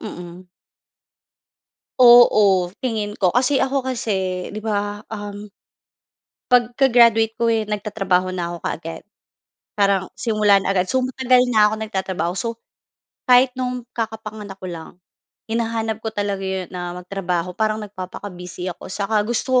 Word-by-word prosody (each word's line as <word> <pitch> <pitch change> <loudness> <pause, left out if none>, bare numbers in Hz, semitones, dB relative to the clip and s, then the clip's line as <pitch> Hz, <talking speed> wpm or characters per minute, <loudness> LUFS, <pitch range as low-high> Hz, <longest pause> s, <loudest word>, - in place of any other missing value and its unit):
Mm. 175 +1 -9 1.5
Oo, 210 -7 +6
tingin 215 -4 -2
ko. 185 -4 +2
Kasi 260 +6 +2
ako 265 0 -1
kasi 190 -7 -2
'di 215 - -6
ba, 205 -1 -3
um 205 0 -7 1.1
'pag 245 -1 +3
ka 270 - +5
graduate 225 -2 +5
ko 235 - +3
eh, 225 -1 +1
nagtatrabaho 195 -3 -1
na 175 -1 -3
ako - - -5
kaagad. 165 0 -5 0.7
Parang 200 -2 +2
simula 210 -3 +3
na 195 - -2
agad. 185 -1 +1
So, 260 - +2
matagal 255 0 +3
na 215 -3 +5
ako - - -1
nagtatrabaho. 190 -5 -2
So, 230 - -2 0.8
kahit 250 0 +5
no'ng 250 -1 -3
kakapanganak 215 -3 -6
ko 185 - -6
lang, 165 -2 -8 0.6
hinahanap 225 -1 -1
ko 220 - -1
talaga 200 -1 -2
'yon 190 -1 -3
na 175 0 -5
magtrabaho 180 -1 -3
parang 215 0 0
nagpapaka-busy 185 -2 -7
ako. - - -11
'Tsaka 205 +2 0
gusto 250 +2 +1
210 Hz, 140 wpm, -21 LUFS, 185-230 Hz, 1.5 s, Oo